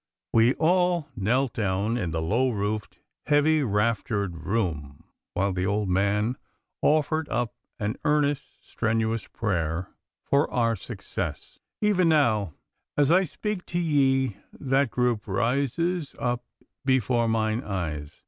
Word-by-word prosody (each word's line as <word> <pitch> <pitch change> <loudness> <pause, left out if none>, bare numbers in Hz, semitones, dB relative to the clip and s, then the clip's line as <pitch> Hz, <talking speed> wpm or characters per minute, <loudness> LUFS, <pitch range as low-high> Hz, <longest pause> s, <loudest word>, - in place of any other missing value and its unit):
We 115 +3 +5
all 175 -1 +2
knelt 120 +5 +1
down 105 +2 0
in 90 -8 -1
the 80 0 -2
low 115 +10 +2
roofed, 105 -2 -3 0.3
heavy 150 +1 +4
raftered 105 - -1
room 80 -10 -2 0.3
while 100 +1 +1
the 90 +1 -1
old 105 0 0
man 100 +6 +1 0.4
offered 155 +1 +2
up 120 -1 -1 0.2
an 105 +3 -2
earnest, 145 -1 0
strenuous 115 -1 -1
prayer 85 -5 -2 0.3
for 140 +2 +2
our 115 -2 +1
success. 95 - -6 0.2
Even 190 -5 +3
now, 110 - +2 0.4
as 145 0 +4
I 185 +2 +5
speak 205 +3 -4
to 175 - -1
ye, 135 - +2 0.2
that 135 -1 +2
group 120 -3 0
rises 140 - 0
up 120 0 -1 0.4
before 125 -3 +2
mine 110 +1 0
eyes. 80 -7 -4
115 Hz, 125 wpm, -26 LUFS, 100-140 Hz, 0.4 s, We